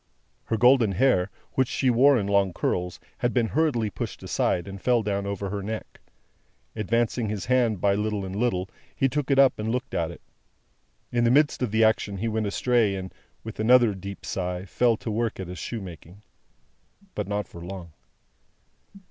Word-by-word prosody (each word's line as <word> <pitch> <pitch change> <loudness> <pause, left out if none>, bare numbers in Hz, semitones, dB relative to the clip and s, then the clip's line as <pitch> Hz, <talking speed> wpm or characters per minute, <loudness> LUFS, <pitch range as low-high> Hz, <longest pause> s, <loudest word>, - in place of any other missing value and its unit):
Her 115 - -1
golden 125 -3 +5
hair, 100 -3 +3 0.2
which 130 -1 +2
she 130 0 +1
wore 135 +3 +5
in 105 - -1
long 100 -2 +2
curls, 90 0 -2 0.2
had 120 +1 0
been 115 -3 +2
hurriedly 130 -9 +1
pushed - - -6
aside, 90 +1 0
and 100 0 -8
fell 120 -3 +2
down 100 -1 -2
over 100 0 -3
her 100 -1 -3
neck. 110 +2 -6 0.8
Advancing 115 +1 0
his 105 -3 -3
hand 120 -5 +2
by 100 +2 +3
little 105 -1 -1
and 95 0 -6
little, 100 -5 0 0.3
he 135 - +2
took 145 +2 -2
it 135 - +3
up 135 -4 +5
and 105 +1 -2
looked 125 +2 -3
at 80 -1 0
it. 85 - -11 0.9
In 120 -1 +1
the 120 - +4
midst 145 +3 +3
of 125 - 0
the 110 +2 +2
action 110 -2 +2
he 110 +4 -2
went 110 -1 -1
astray, 110 -1 +2
and, 95 -1 -6 0.3
with 110 -1 -8
another 120 0 +5
deep 100 +1 -8
sigh, 90 0 -3
fell 115 +6 +2
to 110 - -5
work 115 0 -1
at 95 - -5
his 90 - -7
shoemaking. 95 -2 -8 0.9
But 105 - -3
not 105 -1 -2
for 85 - -11
long. 90 -2 -8
105 Hz, 185 wpm, -26 LUFS, 95-120 Hz, 0.9 s, golden